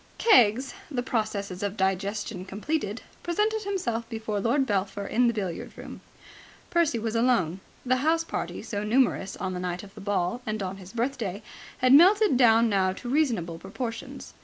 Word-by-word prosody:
Keggs, 260 - +4 0.2
the 250 -5 -2
processes 205 -6 -2
of 205 0 -3
digestion 195 +1 -1
completed, 210 +3 -3 0.2
presented 425 +5 0
himself 240 - -2
before 220 -3 -3
Lord 250 +7 +2
Belpher 200 -2 -1
in 245 +4 +2
the 235 - +2
billiard 190 -5 -4
room. - - -9 0.7
Percy 340 -8 +2
was 225 0 -3
alone. 230 -8 +2 0.3
The 255 +1 +2
house 320 +5 +2
party, - - -4
so 205 -1 -4
numerous 215 -3 +1
on 190 -1 -3
the 180 - -4
night 180 0 -3
of 195 -1 -13
the 210 - -11
ball 200 +3 -1
and 215 -2 -3
on 190 +1 -4
his 190 -1 -11
birthday, 230 -5 -2 0.3
had 255 +1 +4
melted 385 +4 +6
down 230 -2 +5
now 190 -3 +2
to 240 - -7
reasonable 230 - 0
proportions. 225 +5 -6
225 Hz, 165 wpm, -27 LUFS, 195-255 Hz, 0.7 s, melted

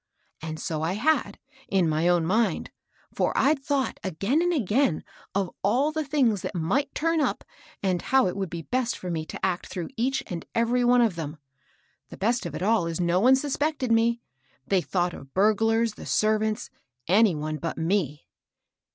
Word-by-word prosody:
And 155 0 -5
so 155 -2 -3
I 165 +3 0
had, 300 +10 +1 0.3
in 190 -3 +2
my 155 +2 +1
own 175 -2 +3
mind; 220 +6 0 0.4
for - - 0
I'd 280 0 +3
thought, 280 -2 -1
again 195 - 0
and 350 0 +2
again, 240 - +1 0.3
of 195 -2 0
all 250 +10 +2
the 315 0 -2
things 260 -9 +1
that - - -5
might 245 - 0
turn 330 0 +1
up, - - -1 0.4
and 185 -3 +1
how 265 -1 +3
it 180 - -1
would 195 -2 -3
be 170 -1 -6
best 250 +5 -1
for 180 - -5
me 160 -1 -3
to - - -3
act 185 -2 -2
through 175 -3 -5
each 260 +4 0
and 170 -2 -5
every 235 +2 +2
one 245 0 +5
of 225 -6 +2
them. 155 -1 -5 0.7
The - - -10
best 235 +4 0
of - - -7
it - - -4
all 215 -4 +2
is 165 0 -3
no 175 +1 +2
one 255 +6 +6
suspected 285 -1 -1
me. 230 +1 +2 0.4
They 195 -2 +2
thoi\ght 175 -1 -1
of 135 0 -12
burglars, 225 +3 +3
the - - -10
servants, 215 +1 +1 0.4
any 200 0 +4
one 155 +1 -3
but 165 +1 -4
me." 160 -4 -1
210 Hz, 185 wpm, -26 LUFS, 175-250 Hz, 0.7 s, one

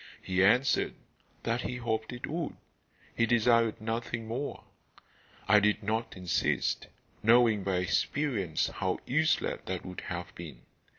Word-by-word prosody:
He 95 0 +2
answered 125 +7 +3 0.5
that 115 +2 0
he 125 - -3
hoped 110 -2 -2
it 125 0 -5
would. 165 -1 -3 0.6
He 115 - +2
desired 115 -1 +3
nothing 115 +1 -3
more. 130 +6 -4 0.8
I 105 +2 +7
did 105 +1 +1
not 110 +1 -2
insist, 90 -3 0 0.3
knowing 115 -2 +5
by 95 -1 0
experience 95 - 0
how - - -2
useless 155 +5 +1
that 95 -1 -4
would 90 -1 -7
have 85 -1 -6
been. 75 -8 -10
110 Hz, 130 wpm, -30 LUFS, 95-120 Hz, 0.8 s, I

